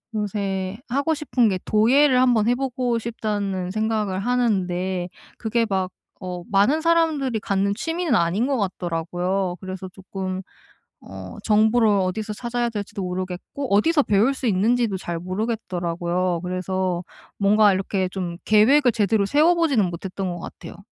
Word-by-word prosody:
요새 200 -2 -2
하고 280 +5 +1
싶은 255 -7 +1
게 185 -1 -1
'도예를 255 +5 +4
한번 240 -4 +3
해 245 - +3
보고 250 -2 -1
싶다.'는 205 -5 -3
생각을 215 -3 -1
하는데 190 -6 0 0.3
그게 230 0 0
막 190 -2 -1 0.3
어 180 -1 -5
많은 245 +11 +3
사람들이 315 -8 +2
갖는 200 0 0
취미는 330 - -1
아닌 185 +5 +2
것 275 -2 0
같더라고요. 180 0 -2
그래서 185 0 -6
쪼끔 190 0 -6 0.6
어 95 -1 -9
정보를 220 +1 +4
어디서 200 +2 0
찾아야 240 +2 -2
될지도 205 -1 -5
모르겠고 185 +7 -4
어디서 295 +8 +3
배울 215 +6 +3
수 260 -1 -3
있는지도 220 +1 +2
잘 170 -2 -4
모르겠더라고요. 180 -3 -2
그래서 185 0 -2 0.3
뭔가 205 0 +4
이렇게 190 0 -1
좀 180 -2 -5
계획을 245 +5 +5
제대로 215 -2 +2
세워 300 - +4
보지는 280 - +2
못했던 185 +2 -4
것 175 - -7
같아요. - - -9
205 Hz, 325 characters per minute, -23 LUFS, 185-240 Hz, 0.6 s, 계획을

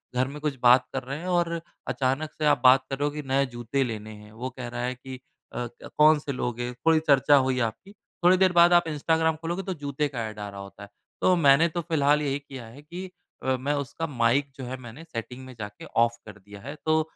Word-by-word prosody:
घर 130 +1 +2
में 145 +2 -8
कुछ 150 -2 -1
बात 125 +1 +6
कर 135 -1 -2
रहे 135 +3 -5
हैं 175 - -7
और 170 -2 0 0.3
अचानक 135 +4 -1
से 155 - -3
आप 150 - +3
बात 130 0 +6
कर 135 - -3
रहे 145 - +1
हो 145 - -2
कि 150 - -3
नए 135 +1 +2
जूते 120 +2 -2
लेने 110 -3 -5
हैं। 105 0 -14
वो 125 +4 -5
कह 125 -1 -7
रहा 120 0 -5
है 125 +1 -2
कि 130 +1 -9 0.3
अ, 120 - -3
क्या 120 - -13
कौन 155 0 +6
से 145 - -5
लोगे? 120 -1 -3
कोई 160 -1 +5
चर्चा 140 0 +5
हुई 130 -2 +2
आपकी, 120 - -3 0.3
थोड़ी 180 +1 +6
देर 190 -1 +4
बाद 175 0 +6
आप 175 - +6
इंस्टाग्राम 160 +1 +1
खोलोगे, 170 +4 -4
तो 190 0 -3
जूते 145 -1 -2
का 120 -5 -4
एड 105 -1 -11
आ 105 - -5
रहा 100 - -9
होता 100 +1 -11
है। 100 - -11 0.3
तो 185 - +4
मैंने 155 0 +5
तो 170 +2 -3
फिलहाल 150 -3 +2
यही 140 -1 -1
किया 135 -4 -10
है 125 +6 -13
कि 175 +5 -8 0.3
अ, 130 0 +1
मैं 140 +4 -1
उसका 145 +3 -3
माइक 135 +1 +1
जो 135 - -8
है 125 +1 -4
मैंने 125 +4 -11
सेटिंग 130 -3 -7
में 130 - -10
जाके 105 -1 -8
ऑफ़ 115 0 +1
कर 105 -1 -11
दिया 100 +1 -13
है। 140 +6 -7
तो 155 0 +3
135 Hz, 250 wpm, -26 LUFS, 120-155 Hz, 0.3 s, बात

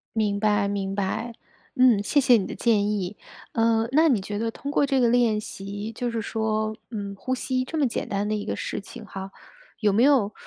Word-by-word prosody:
明 210 -2 +1
白 210 -1 +2
明 195 -1 -2
白， 205 +4 -2 0.4
嗯， 250 -6 +5
谢 285 - +2
谢 255 -3 +6
你 195 - -1
的 - - -6
建 210 -3 +2
议。 200 -1 -2 0.4
呃， 225 0 +2
那 315 +4 +5
你 245 -7 +3
觉 205 +2 -4
得 225 +1 0
通 280 +5 -6
过 290 - +3
这 270 -1 +1
个 245 - +4
练 235 -3 +3
习， 205 0 -6
就 245 +2 -2
是 230 -1 -2
说， 220 0 -1
嗯， 200 -3 -5
呼 255 +6 -2
吸 255 0 -1
这 315 +5 -5
么 290 -3 +3
简 235 - -4
单 200 -1 -1
的 215 - -1
一 205 - -4
个 - - -2
事 - - -4
情 220 +2 -11
哈， 195 -1 -7 0.5
有 210 -3 +2
没 225 +4 +4
有， 255 -7 +4
220 Hz, 235 characters per minute, -25 LUFS, 205-245 Hz, 0.5 s, 谢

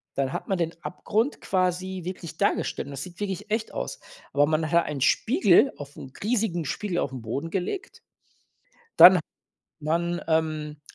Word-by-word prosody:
dann 135 -1 -1
hat - - -4
man 190 - +1
den 165 -1 -1
Abgrund 225 +9 -1
quasi 185 0 -1
wirklich 175 -2 -7
dargestellt, 200 -7 0
und - - -8
das 135 - -5
sieht 180 0 -11
wirklich 205 +1 -4
echt 220 0 -1
aus. - - -4 0.3
Aber 145 +1 +4
man 155 0 0
hat 170 0 +4
einen 140 -3 -4
Spiegel 235 - +4
auf 145 0 -9
'n 130 - -10
riesigen 210 -8 0
Spiegel 190 +4 -3
auf'n 130 -3 -3
Boden 135 +9 -4
gelegt. 195 - -4 1.0
Dann 180 -1 +10 0.6
man, 170 +3 -1
ähm 155 -2 -1
175 Hz, 160 wpm, -26 LUFS, 150-195 Hz, 1.0 s, Dann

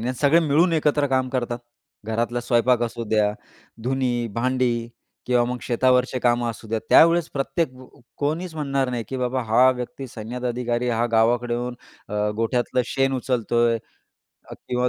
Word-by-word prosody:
नाही 125 +3 -2
सगळे 150 +4 +5
मिळून 165 +3 +3
एकत्र 150 -2 +2
काम 130 -1 +1
करतात. 120 -2 -2 0.5
घरातला 115 +2 -1
स्वयंपाक 120 0 +2
असू 115 0 -3
द्या, 105 -1 +2 0.5
धुनी 125 -1 0
भांडी 120 -1 0 0.4
किंवा 125 -1 +3
मग 125 0 -3
शेतावरचे 125 +1 +2
कामं 120 -1 +2
असू 110 -1 -11
द्या, 110 - 0
त्यावेळेस 170 0 +6
प्रत्येक 135 +1 -1
व 130 0 -13 0.3
कोणीच 160 +4 -2
म्हणणार 140 -4 -1
नाही, 120 -2 -3
की 135 - -4
बाबा 125 0 -1
हा 125 +4 +5
व्यक्ती 125 +1 -5
सैन्यात 120 +3 -7
अधिकारी 120 0 -1
हा 120 0 +1
गावाकडे 120 +2 +2
येऊन 120 +1 -3 0.3
अ, 105 +1 -1
गोठ्यातलं 120 +2 0
शेण 135 -1 0
उचलतो 120 -2 0
आहे 115 - +1 0.9
किंवा 125 0 +1
125 Hz, 155 wpm, -23 LUFS, 120-130 Hz, 0.9 s, त्यावेळेस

